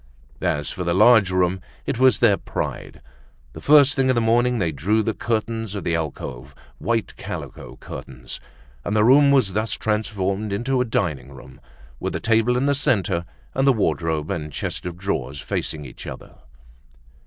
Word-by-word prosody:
As - - -1
for 90 - -4
the 85 0 0
large 110 -1 +6
room, 90 0 +1 0.2
it - - -2
was 130 -4 +5
their 110 -4 +4
pride. - - -5 0.5
The - - -9
first 145 -1 +6
thing 135 -1 +2
in 130 - +3
the - - +3
morning, 120 +2 +2
they 85 -6 0
drew 100 +10 +1
the 110 - -1
curtains 110 -1 -2
of 100 - -4
the 85 - -1
alcove, 70 -4 -5 0.2
white 115 -2 -1
calico - - -7
curtains; 65 -2 -8 0.4
and 100 - -2
the 105 - +4
room 140 +5 +6
was 130 -9 +3
thus 110 0 0
transformed 105 -1 -1
into 125 +6 0
a - - +1
dining 75 - -2
room, 65 +1 -14 0.4
with - - -3
the - - -2
table 115 +2 +2
in 130 - +1
the 145 - +3
centre, 95 -11 0 0.3
and 135 +1 +1
the 135 - +6
wardrobe 80 -6 -1
and 75 -2 -4
chest 80 - -4
of 85 -1 -6
drawers 90 -7 -3
facing 75 +2 -3
each 65 - -10
other. - - -9
105 Hz, 175 wpm, -22 LUFS, 85-120 Hz, 0.5 s, large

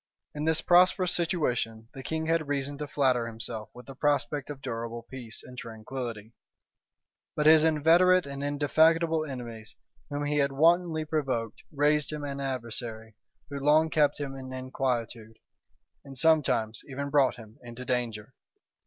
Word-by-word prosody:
In 150 +1 -4
this 160 0 +2
prosperous 180 +1 +4
situation, 125 -10 -1
the 135 - -8
king 160 +4 -3
had 165 -2 +1
reason 140 0 -2
to 150 - -4
flatter 130 -5 +1
himself 110 -1 -6
with 125 0 -13
the 135 - -9
prospect 145 0 0
of 145 -2 -6
durable 115 -2 -5
peace 120 -4 -7
and 125 - -12
tranquillity; 115 -1 -7 1.0
but 150 - 0
his 155 0 +7
inveterate 165 +4 +4
and 140 0 -6
indefatigable 160 +3 +3
enemies, 120 -6 -8 0.3
whom 145 0 -3
he 145 0 0
had 140 -1 +2
wantonly 165 +1 +3
provoked, 130 -8 -2
raised 150 0 +1
him 150 -1 -5
an 140 -1 -4
adversary, 115 -4 -4 0.4
who 140 - -4
long 155 +3 +3
kept 150 -2 +2
him 140 -2 -4
in 130 -1 -8
inquietude, 125 -4 -3 0.7
and 135 -1 -10
sometimes 130 -8 +2
even 140 +1 -4
brought 140 -2 +3
him 115 +2 -14
into 120 +1 -9
danger. 120 -2 -2
140 Hz, 150 wpm, -28 LUFS, 120-150 Hz, 1.0 s, his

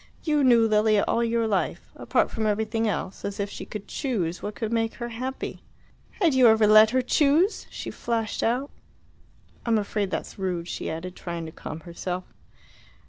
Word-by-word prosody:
"You 300 -3 +2
knew 235 -3 +5
Lilia 215 -1 +3
all 235 - +2
your 230 0 +1
life. 205 -4 -1
Apart - - +1
from 220 -1 -1
everything 220 +2 0
else 195 -2 -3
as 200 +1 -4
if 200 0 -2
she - - -7
could 205 -1 -7
choose 185 - -2
what 210 0 -5
could 225 0 -3
make 225 -1 0
her 240 0 -5
happy!" 255 +3 -5 0.6
"Had 340 -7 +3
you 260 -2 +6
ever 220 -1 +5
let 215 +1 +8
her 255 +2 +1
choose?" 305 - +2
she - - -6
flashed 225 -2 -2
out. 250 +5 0 0.9
"I'm 230 -2 +2
afraid 205 -1 -1
that's 190 - -5
rude," 180 -3 -2
she - - -4
added, 180 +3 -5
trying 170 -2 -5
to 160 - -7
calm 155 0 -8
herself. 180 +1 -5
220 Hz, 180 wpm, -26 LUFS, 195-235 Hz, 0.9 s, let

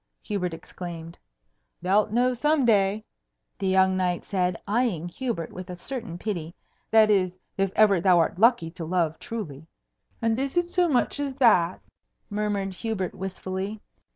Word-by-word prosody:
Hubert 195 -4 -2
exclaimed. 165 0 -8 0.7
"Thou'lt 205 +3 +3
know 250 +3 +2
some 295 +2 +2
day," 210 -1 +2 0.5
the 195 - -1
young 190 0 +4
knight 180 -2 -1
said, 180 -3 0
eying 205 -6 0
Hubert 220 -5 -4
with 185 0 -8
a 180 - -5
certain 220 -2 -6
pity; 175 -5 -4 0.3
"that 220 -1 +6
is, 185 -3 +1 0.2
if 195 -1 0
ever 200 -5 +5
thou 180 -1 +5
art 165 +1 +1
lucky 225 -8 +4
to 170 0 -7
love 165 -1 0
truly." 160 -10 -6 0.5
"And 225 +1 +1
is 275 +4 -2
it 350 0 +2
so 355 -1 +2
much 260 0 +1
as 280 -2 -2
that?" 190 -10 +4 0.5
murmured 205 -2 -1
Hubert 190 -2 -3
wistfully. 190 +2 -4
195 Hz, 155 wpm, -26 LUFS, 180-225 Hz, 0.7 s, that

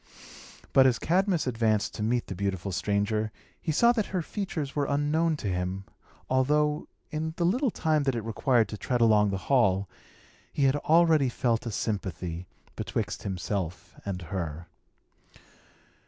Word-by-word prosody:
But, 130 -1 +7
as 125 -3 +2
Cadmus 180 - +1
advanced 110 -4 +1
to - - -6
meet 120 +3 +1
the - - -5
beautiful 95 0 -2
stranger, 105 +3 0 0.3
he 160 - -1
saw 235 +10 +5
that 225 -4 0
her 185 -3 -2
features 160 -8 -4
were 145 -1 +1
unknown 150 +3 +1
to 110 - -4
him, 90 +1 -2 0.4
although, 150 +3 +1 0.2
in 160 +1 -3
the 170 - +1
little 250 +9 +2
time 155 -6 +1
that 135 -2 +1
it 115 - -3
required 115 +1 +2
to 105 - -5
tread 125 -1 -1
along 105 -3 +5
the 95 - -1
hall, 100 -8 +3 0.6
he 145 - -1
had 135 +1 +4
already 155 -2 +4
felt 120 -1 0
a - - -2
sympathy 90 -5 -3 0.3
betwixt - - -3
himself 90 -2 -4
and 95 -3 -4
her. 85 -2 -4
120 Hz, 155 wpm, -28 LUFS, 100-150 Hz, 0.6 s, But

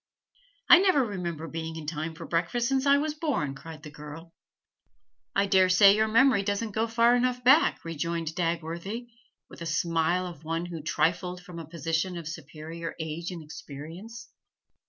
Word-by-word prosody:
'I 345 - +9
never 365 -9 +4
remember 170 -6 -4
being 160 0 -5
in 160 -2 -7
time 160 +1 -4
for - - -8
breakfast 175 +8 0
since 270 +1 +1
I 280 0 +6
was 300 +1 -1
born,' 290 - -1
cried 155 +2 -11
the 150 - -9
girl. 150 +3 -10 1.0
'I 200 - +3
dare 190 -1 +4
say 195 +2 +7
your 220 +1 +2
memory 230 -1 +4
doesn't 205 +2 -2
go 220 +2 0
far 230 +1 +4
enough 250 0 0
back,' 275 - +4
rejoined 165 0 -3
Dagworthy, 170 +7 -3 0.4
with - - -13
the 170 - -5
smile 165 +2 +1
of 170 -4 -9
one 165 +2 -2
who 170 -2 -6
trifled 180 +3 0
from 180 -2 -9
a 165 - -8
position 165 +2 -2
of 165 -3 -7
superior 160 +1 -7
age 160 +2 -4
and 175 -3 -7
experience. 165 +10 -10
170 Hz, 170 wpm, -28 LUFS, 160-220 Hz, 1.0 s, I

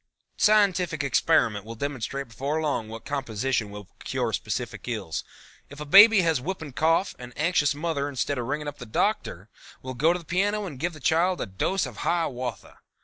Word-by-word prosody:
Scientific 185 -7 +3
experiment 110 -5 +2
will 115 +2 -8
demonstrate 140 0 -4
before 140 +7 -2
long 145 -8 -1
what 115 0 -9
composition 130 -4 -2
will 100 -1 -9 0.2
cure - - -2
specific - - -4
ills. 105 -9 -3 0.5
If 145 - -11
a 150 - -5
baby 205 +6 +8
has 165 -6 +1
whooping 160 -3 -5
cough, 165 +7 +2
an 125 0 -9
anxious 150 -3 +2
mother, 145 -2 -2
instead 140 0 -2
of 120 - -3
ringing 150 +2 -3
up 145 - -6
the 125 - -8
Doctor, 110 - -1 0.4
will 130 0 -5
go 150 +7 +3
to 175 - 0
the 170 - -12
piano 205 +5 0
and 145 -9 -8
give 175 +4 -1
the 155 - -11
child 170 +6 +2
a - - -2
dose 120 - -1
of 125 -5 -9
Hiawatha. 130 - -3
145 Hz, 185 wpm, -26 LUFS, 125-170 Hz, 0.5 s, baby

